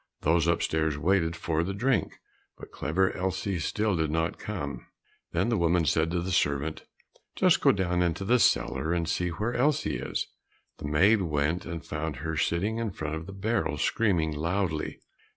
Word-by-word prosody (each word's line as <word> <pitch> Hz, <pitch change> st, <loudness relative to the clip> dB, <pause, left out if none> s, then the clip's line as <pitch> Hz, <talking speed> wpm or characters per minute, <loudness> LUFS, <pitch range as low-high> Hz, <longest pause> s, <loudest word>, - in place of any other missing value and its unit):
Those 85 Hz, +1 st, +2 dB
upstairs 80 Hz, -2 st, +1 dB
waited 85 Hz, 0 st, +1 dB
for 85 Hz, -2 st, -1 dB
the 95 Hz, +3 st, -3 dB
drink, 120 Hz, +1 st, 0 dB, 0.4 s
but -, -, -11 dB
Clever 95 Hz, +5 st, 0 dB
Elsie 95 Hz, 0 st, -2 dB
still 105 Hz, +6 st, 0 dB
did 80 Hz, -2 st, 0 dB
not 80 Hz, +1 st, -1 dB
come. -, -, -5 dB, 0.4 s
Then -, -, +1 dB
the 115 Hz, -, +1 dB
woman 85 Hz, 0 st, +2 dB
said 80 Hz, +3 st, +2 dB
to 85 Hz, 0 st, -1 dB
the 95 Hz, -, -3 dB
servant, 75 Hz, -2 st, 0 dB, 0.5 s
"Just -, -, +4 dB
go -, -, +6 dB
down 90 Hz, -2 st, 0 dB
into 90 Hz, +3 st, 0 dB
the 125 Hz, +4 st, +4 dB
cellar 70 Hz, -, +2 dB
and 85 Hz, -2 st, 0 dB
see 90 Hz, +1 st, 0 dB
where 105 Hz, +8 st, -2 dB
Elsie 140 Hz, +4 st, +1 dB
is." -, -, -2 dB, 0.5 s
The -, -, -5 dB
maid 95 Hz, +9 st, +4 dB
went 80 Hz, +1 st, -1 dB
and 85 Hz, -1 st, -6 dB
found 75 Hz, 0 st, -3 dB
her 80 Hz, +4 st, -4 dB
sitting 100 Hz, +9 st, 0 dB
in 115 Hz, -1 st, -1 dB
front 75 Hz, -5 st, -5 dB
of 80 Hz, +1 st, -5 dB
the -, -, -7 dB
barrel, 100 Hz, -6 st, -1 dB
screaming 85 Hz, -2 st, +1 dB
loudly. 85 Hz, +1 st, -2 dB
85 Hz, 175 wpm, -28 LUFS, 80-95 Hz, 0.5 s, go